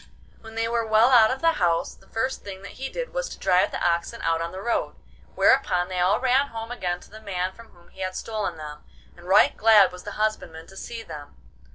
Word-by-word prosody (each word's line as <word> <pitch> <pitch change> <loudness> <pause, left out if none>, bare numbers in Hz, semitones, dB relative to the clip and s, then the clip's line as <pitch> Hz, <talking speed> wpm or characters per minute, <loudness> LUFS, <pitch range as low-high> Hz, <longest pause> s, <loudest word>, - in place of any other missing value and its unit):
When 225 0 -12
they 225 0 0
were 235 0 0
well 220 +3 +5
out 225 -3 +7
of 260 +1 -3
the 330 -1 +2
house, 170 -2 +1
the - - -22
first 260 +4 -2
thing 195 -1 -9
that 200 - -9
he 270 - -3
did - - -5
was - - -2
to - - -9
drive 185 0 +3
the - - -5
oxen 170 0 -1
out 165 0 +1
on 165 0 -3
the 185 - -7
road, 235 +4 -1 0.4
whereupon 180 -2 +3
they 185 -1 -3
all 185 +4 +3
ran 260 +2 +2
home 225 -2 -7
again 180 -7 -3
to - - -17
the 215 +1 -12
man 185 -3 -2
from 230 +2 -14
whom 175 -4 -22
he 190 - -13
had 185 0 -3
stolen 215 -6 -3
them, 150 -1 -9 0.3
and 175 +1 -15
right 190 - +5
glad 215 -3 +6
was 180 0 -10
the 205 - -8
husbandman 215 -6 -2
to 195 - -16
see 230 +3 -7
them. 145 -7 -10
205 Hz, 240 wpm, -25 LUFS, 180-230 Hz, 0.4 s, out